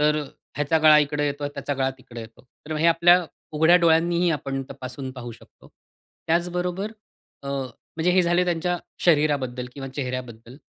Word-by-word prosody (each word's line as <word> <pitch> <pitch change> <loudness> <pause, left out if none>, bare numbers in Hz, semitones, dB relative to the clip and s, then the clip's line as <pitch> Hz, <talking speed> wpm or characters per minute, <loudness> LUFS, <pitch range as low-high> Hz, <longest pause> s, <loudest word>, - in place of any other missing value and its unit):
तर 150 0 +3 0.4
ह्याचा 150 +2 +1
गळा 155 -1 +7
इकडे 150 0 0
येतो, 145 0 -3
त्याचा 145 0 -4
गळा 135 0 0
तिकडे 120 -2 -10
येतो. 115 0 -13 0.2
तर 155 - -4
हे 160 +2 +2
आपल्या 175 +2 +5 0.3
उघड्या 160 +3 +5
डोळ्यांनीही 170 +1 +3
आपण 135 -3 -2
तपासून 130 +1 -7
पाहू 120 -2 -8
शकतो. - - -19 0.6
त्याचबरोबर 180 +4 -1 0.5
अ, 140 - -7
म्हणजे 140 +5 -3
हे 185 - +4
झाले 175 +1 +2
त्यांच्या 175 0 0 0.2
शरीराबद्दल 145 -6 +1
किंवा 135 -1 -6
चेहऱ्याबद्दल. 125 -2 -6
150 Hz, 150 wpm, -24 LUFS, 135-170 Hz, 0.6 s, गळा